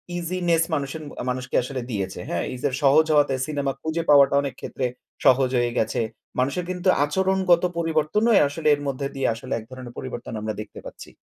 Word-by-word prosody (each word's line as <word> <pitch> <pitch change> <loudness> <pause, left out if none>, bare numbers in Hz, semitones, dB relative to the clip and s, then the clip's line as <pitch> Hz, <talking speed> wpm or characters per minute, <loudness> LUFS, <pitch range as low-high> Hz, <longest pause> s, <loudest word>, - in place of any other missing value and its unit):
easyness 170 -1 +1
মানুষ 140 -1 -1
N 155 - -9 0.3
মানুষকে 125 0 -3
আসলে 130 0 -4
দিয়েছে। 95 -3 -3
হ্যাঁ, 85 - -1
user 135 +1 -2
সহজ 145 +3 +6
হওয়াতে 145 -2 +3
সিনেমা 140 -2 -1
খুঁজে 160 +1 -2
পাওয়াটা 140 -1 +6
অনেকক্ষেত্রে 135 -1 -4 0.4
সহজ 130 0 +5
হয়ে 120 0 +1
গেছে। 110 - 0 0.4
মানুষের 140 +8 0
কিন্তু 180 +1 -3 0.2
আচরণগত 190 +1 +2
পরিবর্তনও 165 +8 +1 0.2
আসলে 155 +2 -3
এর 145 - -10
মধ্যে 140 0 -2
দিয়ে 135 - 0
আসলে 115 - -6
এক 110 - -6
ধরনের 125 -2 -9
পরিবর্তন 125 -2 -6
আমরা 110 0 -3
দেখতে 105 - -10
পাচ্ছি। - - -10
140 Hz, 170 wpm, -24 LUFS, 130-165 Hz, 0.4 s, সহজ